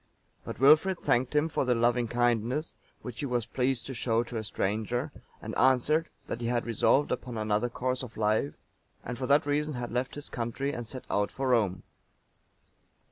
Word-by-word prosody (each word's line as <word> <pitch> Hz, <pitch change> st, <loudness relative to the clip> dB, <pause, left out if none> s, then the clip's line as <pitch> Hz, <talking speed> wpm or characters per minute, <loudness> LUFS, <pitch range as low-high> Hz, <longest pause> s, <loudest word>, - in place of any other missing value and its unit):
But -, -, -7 dB
Wilfrid 155 Hz, +7 st, +6 dB
thanked 125 Hz, 0 st, +1 dB
him 150 Hz, +2 st, +3 dB
for 160 Hz, -, -1 dB
the 125 Hz, -2 st, +2 dB
loving 120 Hz, +1 st, +2 dB
kindness 120 Hz, +5 st, 0 dB, 0.3 s
which 120 Hz, -2 st, -7 dB
he 145 Hz, -, -2 dB
was 120 Hz, -3 st, -1 dB
pleased 125 Hz, 0 st, -1 dB
to 135 Hz, -, -5 dB
show 115 Hz, -1 st, +1 dB
to 120 Hz, -1 st, -6 dB
a 110 Hz, -, -3 dB
stranger, 110 Hz, +7 st, -2 dB, 0.3 s
and -, -, -5 dB
answered, 130 Hz, +6 st, +3 dB, 0.2 s
that 120 Hz, -, -5 dB
he 115 Hz, -, -1 dB
had 120 Hz, 0 st, 0 dB
resolved 120 Hz, +5 st, +2 dB
upon 125 Hz, -2 st, -3 dB
another 110 Hz, +2 st, 0 dB
course 125 Hz, +1 st, -2 dB
of 125 Hz, -3 st, -8 dB
life, 105 Hz, -9 st, +1 dB, 0.5 s
and 125 Hz, -, -4 dB
for 130 Hz, +1 st, -3 dB
that 145 Hz, +1 st, +4 dB
reason 150 Hz, 0 st, 0 dB
had 120 Hz, -1 st, -4 dB
left 125 Hz, +2 st, -2 dB
his 145 Hz, 0 st, -6 dB
country 125 Hz, +4 st, -3 dB
and 120 Hz, -1 st, -5 dB
set 130 Hz, +2 st, -6 dB
out 105 Hz, 0 st, +1 dB
for 135 Hz, -1 st, -2 dB
Rome. 100 Hz, -7 st, +2 dB
125 Hz, 190 wpm, -29 LUFS, 115-135 Hz, 0.5 s, Wilfrid